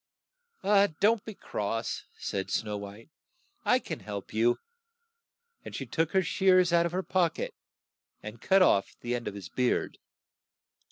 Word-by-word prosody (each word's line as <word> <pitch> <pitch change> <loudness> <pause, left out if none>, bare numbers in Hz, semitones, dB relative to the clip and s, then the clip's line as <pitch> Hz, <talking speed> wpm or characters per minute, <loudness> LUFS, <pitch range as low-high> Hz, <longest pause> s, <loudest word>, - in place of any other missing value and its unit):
" 200 - +2
"Don't 220 +1 +3
be 220 - -7
cross," 115 - -3
said 95 -1 -3
Snow 105 -1 -1
White. 100 +6 -9 0.5
I 250 - +4
can 165 - -5
help 100 -2 -7
you," 115 +2 +3 1.1
and - - -8
she - - -4
took 165 -1 -1
her 190 -1 +4
shears 185 0 +3
out 170 0 +4
of - - -7
her 185 +2 -1
pock 175 -4 +1
et - - -4 0.7
and 110 +1 -8
cut 190 0 +5
off 100 - +3
the 120 0 -2
end 120 -1 -3
of 100 - -4
his 100 -4 -7
beard. 125 +5 0
160 Hz, 160 wpm, -29 LUFS, -, 1.1 s, cut